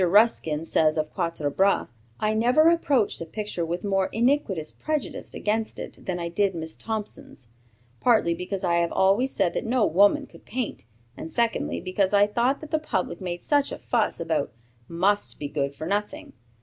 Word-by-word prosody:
Ruskin 175 -5 +3
says 155 -1 +2
of 155 0 -2
"Quatre 155 -3 -2
Bras": 195 +6 +2 0.3
"I 215 0 +1
never 250 +9 +4
approached 280 - +1
a - - -3
picture 210 -2 -4
with 170 +2 -3
more 195 -2 +1
iniquitous 225 - +1
prejudice 305 -2 -4
against 220 +1 -1
it - - -9
than 180 -2 -1
I 170 -1 -3
did 190 +2 0
Miss 160 -1 -5
Thompson's; 210 - -6 0.5
partly 220 -8 +3
because 180 +3 -4
I 170 0 +2
have 170 0 +1
always 205 +8 +3
said 190 -4 +1
that - - -2
no 240 0 +2
woman 205 - +4
could - - -17
paint, 245 - -4 0.3
and 160 - -7
secondly, 235 +5 0
because 190 +2 0
I 200 0 +6
thought 240 +7 0
what 310 - -9
the 315 - +2
public 185 - -3
made 175 -1 -4
such 290 -1 +2
a - - -4
fuss 230 -3 0
about 160 -5 -1 0.4
must 195 +5 +1
be 145 - -4
good 140 -1 -2
for 155 +3 -6
nothing. 205 +4 -3
195 Hz, 180 wpm, -25 LUFS, 170-225 Hz, 0.5 s, I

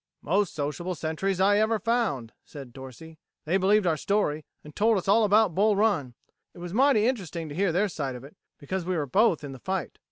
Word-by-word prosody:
"Most 195 +4 0
sociable 155 +5 -3
sentries 170 +4 -2
I 205 +2 +4
ever 220 +1 +2
found," 215 - -1
said 135 -5 -11
Dorsey. 140 +5 -12 0.3
"They 170 +5 +1
believed 200 +2 +3
our 165 -3 +1
story, 155 -4 -1 0.2
and 150 0 -13
told 220 +1 +3
us 190 - -4
all 215 +3 +4
about 210 -2 +3
Bull 210 +4 +3
Run. 185 - 0 0.4
It - - -14
was 175 0 -7
mighty 250 -2 +3
interesting 175 - -3
to 145 - -8
hear 190 +1 +1
their 190 +6 +1
side 140 -8 -4
of 125 - -10
it, 140 - -14 0.2
because 185 +5 -4
we 180 0 -2
were 150 - -1
both 185 - +2
in 140 - -6
the 130 - -10
fight." 190 +4 -4
180 Hz, 215 wpm, -26 LUFS, 150-210 Hz, 0.4 s, I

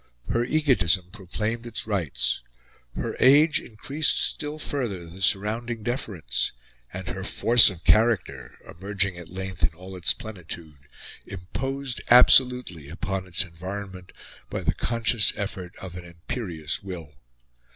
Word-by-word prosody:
Her 120 - +1
egotism 120 - +2
proclaimed 110 +3 -4
its 115 - -3
rights. 65 - -1 0.5
Her - - -3
age 150 +4 +6
increased 140 +8 0
still 150 +1 -2
further 120 - -4
the 85 +3 -11
surrounding 110 +4 0
deference; 105 - -2 0.4
and - - -7
her - - -5
force 120 -1 +6
of 90 -4 -9
character, 95 - +2
emerging 95 +1 -2
at 85 -2 -10
length 95 0 -6
in - - +4
all 95 +2 -10
its 90 - +1
plenitude, 85 -8 -9 0.4
imposed 130 +8 -4
absolutely 125 - +5
upon 95 +2 -4
its 90 +4 +1
environment 95 +1 -8 0.4
by - - -3
the - - 0
conscious 115 -2 +2
effort 95 -3 -5
of 90 -2 -9
an 90 -1 -8
imperious 85 -2 -4
will. 85 -6 -8
95 Hz, 130 wpm, -25 LUFS, 85-120 Hz, 0.5 s, age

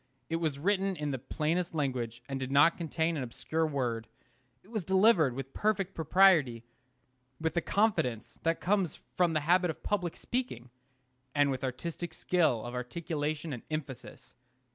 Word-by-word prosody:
It 165 - 0
was 160 -4 -1
written 195 +4 +1
in 150 -3 -2
the 130 - -3
plainest 165 +6 -1
language, 125 -5 -2
and 135 -1 -3
did 130 0 -4
not 145 +4 +6
contain 165 0 -1
an - - -2
obscure 155 +6 -2
word. 120 -6 -2 0.6
It 205 - -19
was 215 -5 -2
delivered 190 - +4
with 135 0 -6
perfect 200 -3 0
propriety, 160 -8 +4 0.8
with 160 -1 -1
the 170 - +1
confidence 175 - 0
that 165 0 +1
comes 190 -4 0 0.2
from 175 -2 +3
the 155 - +1
habit 180 +4 +3
of 160 - -5
public 180 -5 -1
speaking, 130 - -4 0.6
and 145 -1 +4
with 130 -1 -3
artistic 165 +7 -4
skill 155 -11 +1
of 120 - -6
articulation 150 +4 -3
and 120 - -6
emphasis. 155 -5 -6
155 Hz, 160 wpm, -31 LUFS, 135-180 Hz, 0.8 s, not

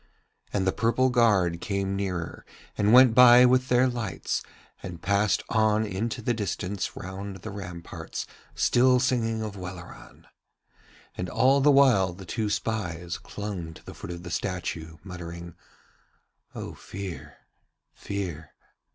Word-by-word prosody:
And 95 -2 0
the 95 - +3
purple 120 +5 +1
guard 95 -8 +3
came 100 -1 -2
nearer 90 -4 -4 0.3
and 105 +1 +2
went 125 -1 +8
by 125 0 +8
with 130 +1 +3
their 125 +1 +4
lights, 120 -6 -3 0.4
and 90 -3 -7
passed 100 +2 +1
on 110 -1 +2
into 110 +3 -3
the 120 - +1
distance 100 -3 -3
round 95 +1 -6
the - - -6
ramparts 90 -4 -7 0.3
still 125 +1 +4
singing 115 -3 0
of 105 -2 -5
Welleran. 90 -1 -10 0.9
And 90 0 -4
all 135 +6 +3
the 145 - +5
while 125 -10 +5
the 95 +2 -11
two 110 +4 -2
spies 90 -6 -3
clung 95 -6 -6
to - - -16
the - - -9
foot - - -9
of 85 0 -7
the 90 - -7
statue, 80 -4 -4
muttering: 85 -2 -8 1.0
'O - - -6
Fear, 85 -7 -8 0.6
Fear.' 85 -6 -5
100 Hz, 135 wpm, -27 LUFS, 90-115 Hz, 1.0 s, went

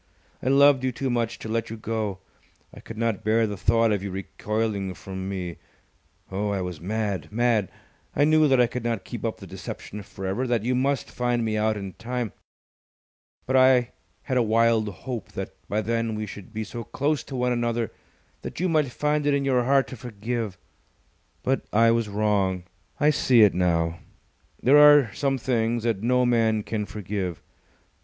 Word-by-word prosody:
I - - -4
loved 140 -1 +5
you 130 - +1
too 130 +1 -2
much 120 -1 -1
to - - -8
let 115 +1 -2
you 115 - -6
go! 110 -3 -3 0.6
I - - -11
could 115 - -10
not 115 -3 -1
bear 110 +1 +3
the 105 -1 -3
thought 115 +3 +2
of 100 -2 0
you 100 - -4
recoiling 100 0 -3
from 95 0 -6
me. 90 -3 -4 0.7
Oh, 100 +2 -1
I 100 -1 -1
was 90 -3 -5
mad 100 -4 -2
mad! 115 -4 +2 0.5
I 145 - +3
knew 155 0 +5
that 135 -2 +4
I 125 - +6
could 125 0 -5
not 115 -3 -1
keep - - -7
up - - -2
the - - -10
deception 105 - -7
for 95 0 -9
ever, 105 +8 -1
that 120 -3 0
you 125 +2 +1
must 135 +1 0
find 120 -1 0
me 110 -1 -1
out 110 0 +1
in 100 -2 -6
time. 120 -2 -4 1.1
But 130 - 0
I 130 -2 +5 0.3
had 130 - -1
a - - +4
wild 115 -1 +3
hope 115 +4 -7
that - - -5 0.2
by 105 +1 0
then 115 0 -1
we 105 0 -3
should 100 0 -10
be 110 0 -3
so 115 +3 -6
close 145 +6 -1
to 135 - -7
one 125 0 +1
another 120 -1 -1 0.5
that - - -7
you 185 - +1
might 155 -5 +2
find 150 +3 0
it 145 - +3
in 140 -1 0
your 125 -3 +2
heart 135 +1 +3
to - - -7
forgive. 115 -3 -4 0.9
But 135 +1 0
I 115 +2 +5
was 115 -2 0
wrong. 100 -3 +1 0.4
I 150 +1 +5
see 125 -5 +5
it 105 - +5
now. 85 -2 +1 0.6
There 140 +4 +7
are 145 -6 +7
some 135 -1 0
things 115 -2 0
that 115 -4 0
no 125 +2 +2
man 115 -3 +2
can 105 -1 -3
forgive. 95 -4 -4
115 Hz, 190 wpm, -25 LUFS, 105-125 Hz, 1.1 s, There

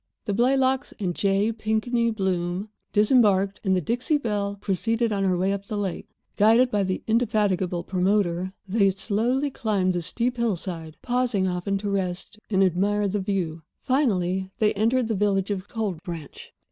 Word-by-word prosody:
The 205 - -1
Blaylocks 260 +4 +2
and 185 -4 -1
J. 200 +4 +1
Pinkney 225 +2 0
Bloom 190 -2 -2 0.2
disembarked, 205 -3 +3
and 190 -2 +2
the 180 - +1
Dixie 245 - 0
Belle 205 -6 -2
proceeded 225 +4 0
on 200 -1 0
her 185 -2 +2
way 190 +2 +1
up 200 0 -5
the 215 - -3
lake. 195 -3 -3 0.3
Guided 230 +4 +5
by 205 - +1
the 185 -1 -2
indefatigable 205 -6 +1
promoter, 185 -1 0 0.2
they 200 0 +3
slowly 230 +8 0
climbed 200 -7 0
the 175 - -1
steep 240 +8 -1
hillside, 175 -8 -3
pausing 245 -6 +1
often 180 +2 -1
to 200 +1 -3
rest 190 +2 -3
and 195 -2 +3
admire 200 +3 +1
the 200 +2 -1
view. 180 -5 -2 0.2
Finally 190 -9 0
they 215 -1 +2
entered 230 +4 +1
the 225 - 0
village 200 -1 +1
of 195 -1 -3
Cold 205 -8 -3
Branch. 170 -6 -8
200 Hz, 160 wpm, -25 LUFS, 185-225 Hz, 0.3 s, Guided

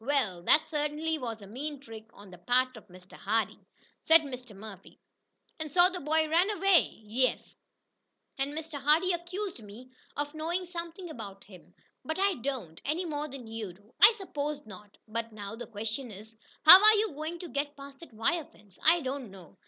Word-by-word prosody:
"Well, 250 -10 0
that 310 +1 +5
certainly 305 +1 -2
was 230 -5 -6
a - - -9
mean 280 +8 -6
trick 225 -4 -12
on 200 -2 -15
the 180 - -13
part 255 +5 +1
of 220 - -13
Mr. 180 0 -16
Hardee," 220 +2 -2 0.3
said 325 0 +6
Mr. 250 -6 -9
Murphy. 195 -1 -12 0.6
"And 310 -2 -5
so 355 +4 +5
the 365 - -5
boy 315 +1 +1
ran 340 +5 +3
away?" 390 - +2
"Yes, 245 +5 -1 0.8
and 275 +1 -1
Mr. 320 -3 -6
Hardee 320 +6 +3
accused 360 +1 -5
me 220 +5 -12 0.3
of 290 +1 -3
knowing 335 +4 -2
something 345 +1 -7
about 200 -7 -9
him, 190 -3 -17 0.3
but 315 - -3
I 395 +1 +2
don't 245 - -5
any 315 +6 -1
more 300 -2 -3
than 270 -4 -10
you 220 -4 -6
do." 205 +6 -24
"I 420 - +11
suppose 300 - -4
not. 205 0 -13
But 230 +1 -4
now 205 0 -7
the 240 - -8
question 225 +4 -5
is, 215 +2 -12 0.3
How 365 +6 +12
are 430 0 +8
you 420 -5 0
going 310 +4 -5
to 350 - -8
get 285 +3 -3
past 275 0 -12
that 335 - -13
wire 285 +9 -1
fence?" 205 -7 -22
"I 335 +2 +5
don't 265 -3 -4
know. 185 -4 -14
280 Hz, 190 wpm, -29 LUFS, 220-320 Hz, 0.8 s, How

